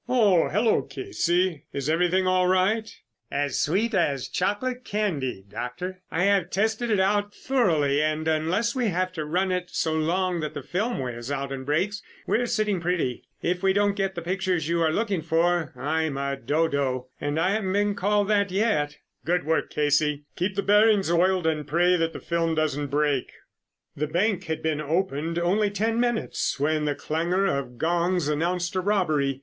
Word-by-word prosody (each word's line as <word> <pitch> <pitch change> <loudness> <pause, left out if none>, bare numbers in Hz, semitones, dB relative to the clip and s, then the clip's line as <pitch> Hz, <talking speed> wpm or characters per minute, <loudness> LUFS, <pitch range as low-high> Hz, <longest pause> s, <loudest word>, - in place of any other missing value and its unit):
Oh, 210 -9 +4
hello, 215 +3 +2
Casey, 180 - -1
is 140 0 -3
everything 180 +4 +2
all 185 0 +3
right?" 195 +4 +2 0.4
"As 140 -2 -1
sweet 210 +9 +1
as 145 -8 +1
chocolate 245 +7 -1
candy, 150 - -2
Doctor. 180 - -6
I 165 - 0
have 195 -3 +2
tested 220 +5 0
it 210 -3 +2
out 205 +2 +1
thoroughly, 160 - +1
and 155 +1 -1
unless 165 +9 +1
we 250 -3 0
have 185 -1 -1
to 155 -4 -4
run 185 +5 0
it 180 -1 -2
so 160 - -1
long 175 +3 0
that 155 -1 -4
the 145 - -5
film 220 - -2
wears 120 -1 -5
out 140 -1 -3
and 130 -1 -6
breaks, 190 +8 0 0.2
we - - +1
are 245 - -1
sitting 210 -6 0
pretty. 170 -8 -1 0.2
If 180 +1 0
we 190 0 +3
don't 205 0 +2
get 195 -1 -1
the 170 - -5
pictures 185 -3 -1
you 170 0 +1
are 160 - +3
looking 200 -1 0
for, 165 0 +1
I'm 155 +1 -1
a 140 0 -1
dodo, 135 -2 -1
and 145 +2 -1
I 185 +4 +2
haven't 200 -3 -1
been 205 0 +2
called 205 +1 +1
that 200 -1 +2
yet." 185 -8 0 0.3
"Good 180 +2 +1
work, 160 +1 0
Casey. 150 0 +1
Keep 190 +2 -1
the 200 - 0
bearings 210 -3 +4
oiled 180 +1 +2
and 155 -3 0
pray 175 +4 +3
that 165 -1 0
the - - -6
film 165 -1 -1
doesn't 145 -2 0
break." 145 -2 0 0.6
The 150 +2 -2
bank 185 +4 0
had 160 -1 -4
been 155 -1 0
opened 165 0 -1
only 195 +5 +2
ten 225 +3 -1
minutes 240 - -1
when 155 +1 +1
the 145 -1 0
clangor 170 +7 0
of 140 -9 -2
gongs 175 +2 +1
announced 170 +3 -1
a 185 - +1
robbery. 155 -9 +1
175 Hz, 180 wpm, -25 LUFS, 150-200 Hz, 0.6 s, Oh